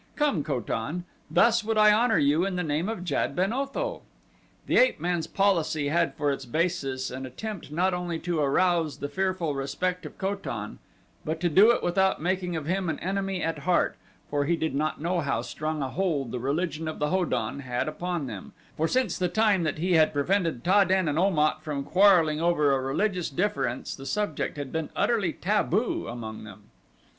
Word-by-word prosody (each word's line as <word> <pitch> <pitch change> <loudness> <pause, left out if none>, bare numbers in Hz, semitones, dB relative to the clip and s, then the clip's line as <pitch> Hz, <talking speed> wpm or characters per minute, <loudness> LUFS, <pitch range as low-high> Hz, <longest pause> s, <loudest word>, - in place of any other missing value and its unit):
Come, 285 - +1
Ko 140 -4 -1
tan; 130 +10 -3 0.3
thus 230 -2 +4
would 220 0 -1
I 210 0 +7
honor 225 +1 +3
you 145 +4 +3
in 195 -1 -1
the 180 - -1
name 155 +5 -1
of 225 -5 -4
Jad - - -1
ben 190 +5 +1
Otho." 275 - -3 0.6
The - - +2
ape - - +4
man's 175 -2 -1
policy 165 -7 +1
had 165 +2 +1
for 145 -2 0
its 135 - -4
basis 135 -2 -1
an 130 +1 -6
attempt 195 - -7
not 180 +4 +1
only 175 -2 -2
to 175 -3 -1
arouse 165 +2 +2
the 145 - -4
fearful 185 0 -1
respect 140 +7 -2
of - - -14
Ko 195 +1 -1
tan 110 - -6 0.4
but 160 +1 -3
to 175 - +2
do 195 +8 +6
it 240 - +2
without 190 +2 +2
making 180 +1 -1
of 155 -2 -3
him 185 +2 -1
an 155 - -2
enemy 195 0 -2
at 165 0 -2
heart, 180 -1 +1 0.3
for 145 -1 0
he 170 +4 +2
did 160 -3 -2
not 155 +2 -1
know 175 +3 0
how 140 -4 -1
strong 155 -1 -3
a 130 - -2
hold 150 -8 -1
the 125 - -3
religion 155 +4 -2
of 155 - -4
the 150 - 0
Ho 185 0 +2
don 120 -4 -2
had 125 -1 -2
upon 175 0 -3
them, 105 -7 -8 0.2
for 160 - +1
since 250 -2 0
the 180 -1 +1
time 210 -2 +3
that 155 -2 -1
he 180 +3 0
had 160 -2 +4
prevented 165 -2 0
Ta 200 +3 +5
den 190 -1 +1
and 150 +2 0
Om 190 -2 +2
at 150 +1 +2
from 145 -3 -3
quarreling 175 -4 +4
over 165 -4 +3
a 135 -1 +1
religious 180 +7 -1
difference 175 -5 -2
the 135 0 -9
subject 210 -8 -2
had 145 -2 -5
been 160 -1 -3
utterly 210 -8 +1
taboo 210 +4 0
among 110 -2 -6
them. 105 -1 -13
170 Hz, 205 wpm, -27 LUFS, 145-190 Hz, 0.6 s, I